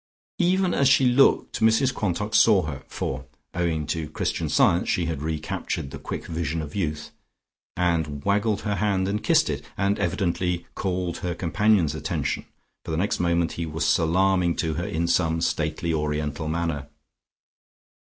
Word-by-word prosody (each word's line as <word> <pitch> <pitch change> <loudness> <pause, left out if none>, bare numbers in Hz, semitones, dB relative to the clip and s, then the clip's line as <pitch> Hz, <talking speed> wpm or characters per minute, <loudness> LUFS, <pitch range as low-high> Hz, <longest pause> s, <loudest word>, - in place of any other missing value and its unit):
Even 185 0 +2
as 140 -1 +3
she 130 0 +5
looked 125 +2 +3
Mrs 110 +4 +3
Quantock 105 0 -2
saw 105 -4 +5
her 70 -4 -5
(for 65 - -4 0.3
owing 85 -4 -1
to 80 0 -3
Christian - - -2
Science 85 +1 +3
she 85 - +1
had 80 -4 -3
recaptured 75 -3 -3
the - - -7
quick - - -6
vision 80 -1 -2
of 75 -2 -6
youth) 75 -6 -3 0.7
and 80 -5 0
waggled 105 +1 +1
her 105 -2 -2
hand 100 -3 +1
and 105 +2 -2
kissed - - +4
it, - - -3
and 100 +2 +1
evidently 90 -2 -1
called 90 -2 -2
her 90 -1 -3
companion's 95 -2 +2
attention, 80 - -3 0.4
for - - -9
the 80 - -1
next 100 +5 0
moment 85 -1 +1
he 85 -1 -4
was 80 +1 -2
salaaming 90 +1 +2
to 80 -3 -1
her 85 +5 -3
in 85 -5 -1
some 80 -1 +2
stately 80 0 -1
Oriental 75 0 -2
manner. 80 -3 -2
85 Hz, 160 wpm, -25 LUFS, 80-100 Hz, 0.7 s, she